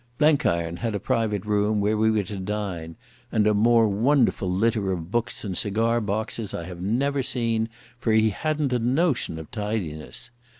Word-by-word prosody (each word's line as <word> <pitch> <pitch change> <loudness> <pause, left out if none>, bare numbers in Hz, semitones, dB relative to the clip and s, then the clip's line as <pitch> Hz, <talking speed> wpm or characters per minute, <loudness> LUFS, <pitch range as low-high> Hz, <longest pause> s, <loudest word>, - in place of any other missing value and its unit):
Blenkiron 85 - +2
had 115 0 -2
a - - -1
private 105 -1 -1
room, 105 0 +1
where 105 +2 +1
we 110 +1 +3
were 110 -2 +2
to 100 +2 -6
dine; 95 -5 -4 0.4
and 105 - +2
a 105 - +4
more 115 +2 +4
wonderful 115 -1 +2
litter 100 +1 +1
of 85 -1 -4
books 120 +1 -1
and 95 -4 -3
cigar 115 +5 +1
boxes 110 +1 -2
I 85 - -4
have 90 0 -8
never 135 +8 0
seen, 115 -3 0 0.3
for 115 -2 0
he 110 0 +4
hadn't 150 +2 -1
a 125 - +2
notion 130 - +1
of 80 -1 -9
tidiness. 105 -9 -4
110 Hz, 175 wpm, -25 LUFS, 100-115 Hz, 0.4 s, a